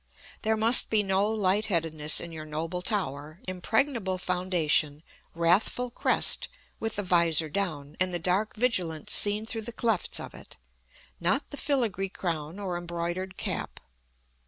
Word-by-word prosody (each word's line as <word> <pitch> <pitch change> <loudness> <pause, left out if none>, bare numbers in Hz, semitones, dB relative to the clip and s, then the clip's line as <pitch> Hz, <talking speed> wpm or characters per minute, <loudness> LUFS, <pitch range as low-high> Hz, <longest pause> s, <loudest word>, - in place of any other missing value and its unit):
There 220 0 +1
must 225 +3 +6
be 215 -2 +3
no 195 +1 +1
light 210 0 +1
headedness 160 -5 0
in 170 - -6
your 160 -1 -7
noble 160 +4 -4
tower: 155 - -2
impregnable 195 +2 0
foundation, 175 -5 0 0.3
wrathful 190 +9 +2
crest, - - +2 0.3
with 225 -1 -2
the 205 - -1
vizor 170 -3 +3
down, 150 -5 -3
and 185 0 +3
the 175 - 0
dark 185 +5 0
vigilance 185 -10 0
seen 210 +1 +2
through 225 0 -3
the 220 - -6
clefts 225 -4 0
of - - -7
it; - - -13 0.6
not 190 +12 0
the - - -5
filigree 230 -11 0
crown 165 -2 -4
or 185 -4 -3
embroidered 175 +2 -4
cap. - - -4
185 Hz, 145 wpm, -28 LUFS, 165-215 Hz, 0.6 s, must